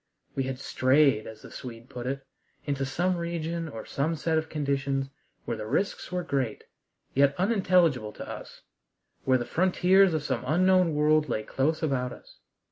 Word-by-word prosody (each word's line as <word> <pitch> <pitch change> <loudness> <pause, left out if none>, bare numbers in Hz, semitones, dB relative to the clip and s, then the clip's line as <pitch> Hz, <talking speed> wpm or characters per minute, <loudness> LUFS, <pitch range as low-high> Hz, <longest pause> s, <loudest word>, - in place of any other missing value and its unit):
We 135 - -1
had 130 -1 -3
"strayed," 130 -3 +3
as 110 -1 -10
the - - -11
Swede 120 -2 -9
put 125 -1 -6
it, 135 +1 -3 0.4
into 140 -2 -1
some 175 +6 0
region 170 -1 -3
or 115 -6 -7
some 155 +4 -1
set 160 +1 0
of 160 0 0
conditions 140 -2 -1 0.3
where 115 - -2
the 110 0 -5
risks 185 - -1
were 180 0 -1
great, 135 -8 -2 0.5
yet 140 +1 +4
unintelligible 180 - +2
to - - -8
us; - - -9 0.6
where 130 -1 +4
the 120 - -3
frontiers 185 +2 +4
of 155 - -1
some - - -2
unknown 180 0 +3
world 150 0 +3
lay 110 -2 -1
close 155 +8 0
about 130 -4 0
us. - - -16
145 Hz, 170 wpm, -28 LUFS, 130-170 Hz, 0.6 s, yet